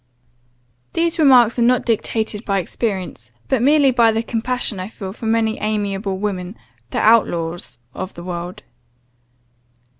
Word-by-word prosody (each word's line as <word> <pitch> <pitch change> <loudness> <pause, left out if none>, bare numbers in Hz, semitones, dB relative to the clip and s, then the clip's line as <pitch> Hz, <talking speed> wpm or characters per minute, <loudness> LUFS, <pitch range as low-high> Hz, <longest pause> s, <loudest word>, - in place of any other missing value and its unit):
"These 335 0 0
remarks 250 -6 +5
are - - +2
not 245 +1 +3
dictated 220 -1 -1
by 195 -3 0
experience; 190 0 -4 0.2
but 265 -4 +1
merely 285 +1 +4
by 235 -2 +4
the 225 +1 -1
compassion 230 -2 -2
I 185 - -4
feel 195 -3 -8
for 225 - -6
many 220 0 +1
amiable 205 -2 -2
women, 190 -1 -4 0.3
the - - -4
outlaws 175 - +1 0.2
of 185 - -6
the 170 - -9
world. 175 0 -6
220 Hz, 140 wpm, -19 LUFS, 190-235 Hz, 0.3 s, remarks